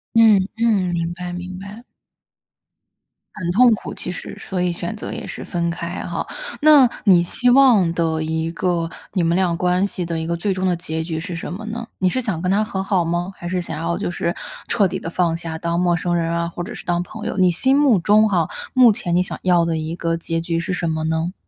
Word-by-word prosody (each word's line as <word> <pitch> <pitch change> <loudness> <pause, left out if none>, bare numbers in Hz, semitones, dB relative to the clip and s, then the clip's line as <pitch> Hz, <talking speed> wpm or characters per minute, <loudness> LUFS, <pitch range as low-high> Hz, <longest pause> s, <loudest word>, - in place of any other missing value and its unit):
嗯 215 -4 +6
嗯， 210 -6 +2
明 170 0 -1
白 180 0 -6
明 180 +1 -6
白。 205 +4 -10 1.5
很 175 -4 -2
痛 240 +5 +6
苦 215 - -5
其 - - -5
实， - - -8
所 185 -2 -3
以 180 -1 +1
选 170 +4 -4
择 210 - -6
也 - - -6
是 - - -7
分 170 -1 -2
开 170 +1 -5
哈。 - - -3 0.4
那 295 -4 +7 0.2
你 180 -4 +6
希 245 +8 +1
望 245 -9 +5
的 160 -1 0
一 160 +1 -2
个 170 -1 -1 0.2
你 180 - +1
们 170 +1 +2
俩 180 -2 +1
关 180 +3 +1
系 180 -3 -4
的 165 -1 -3
一 160 - -4
个 170 0 -1
最 195 +3 -1
终 185 0 -1
的 180 - +2
结 160 -2 -4
局 160 -1 -3
是 175 +1 -5
什 165 - -5
么 210 +5 -6
呢？ 230 +1 -5
你 185 - +1
是 255 +8 0
想 210 -9 -2
跟 180 - +1
他 205 +2 +3
和 190 -3 -3
好 190 -3 +1
吗？ 175 +3 -2
还 175 - -6
是 185 0 -1
想 170 -3 -5
要 170 +1 -1
就 195 -2 -2
是 170 0 -2 0.3
彻 205 -5 +3
底 190 +1 -4
地 165 - -5
放 170 -1 +1
下 165 -1 -5
当 170 +1 -1
陌 175 -1 +2
生 175 0 -1
人 165 -1 0
啊， 170 0 -1
或 170 +1 -6
者 200 +7 -6
是 - - -10
当 175 -1 0
朋 210 +4 -8
友？ - - -3
你 185 -1 +5
心 260 +11 +2
目 280 -6 +4
中 210 +5 +4
哈， 175 -5 +1 0.3
目 255 -3 +7
前 175 -4 -2
你 180 - +3
想 - - -7
要 175 -2 +3
的 165 -1 -1
一 160 +1 -4
个 165 -1 -1
结 165 0 -3
局 165 0 -1
是 170 - -3
什 170 -2 -1
么 160 0 -2
呢？ 160 +3 -1
175 Hz, 260 characters per minute, -21 LUFS, 170-195 Hz, 1.5 s, 那